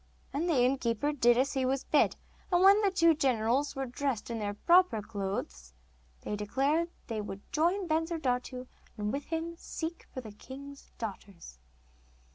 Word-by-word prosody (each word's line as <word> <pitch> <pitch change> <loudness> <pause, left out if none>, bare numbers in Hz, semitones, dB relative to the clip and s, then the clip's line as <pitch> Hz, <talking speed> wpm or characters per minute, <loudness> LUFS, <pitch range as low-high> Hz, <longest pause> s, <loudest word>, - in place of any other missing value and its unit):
And 320 +6 0
the 315 - +3
innkeeper 255 +1 +1
did 240 -4 +4
as 265 +3 +2
he 265 -2 0
was 265 +1 0
bid, - - +3 0.4
and 355 +1 +4
when 400 +2 +7
the 405 - +3
two 335 -3 +4
generals 260 0 +1
were 270 0 -2
dressed 250 -2 -3
in 230 - -3
their 205 -1 -3
proper 345 - +4
clothes, 195 - -5 0.5
they 210 - -3
declared 275 +11 0 0.2
they 225 -3 -3
would 200 -1 -7
join 350 +5 +2
Bensurdatu, 290 -6 -1 0.3
and 210 0 -2
with 280 +1 -3
him 330 +1 -3
seek 330 0 -6
for - - -6
the 220 -3 -9
king's 275 +6 -11
daughters. 195 - -8
265 Hz, 160 wpm, -31 LUFS, 220-320 Hz, 0.5 s, when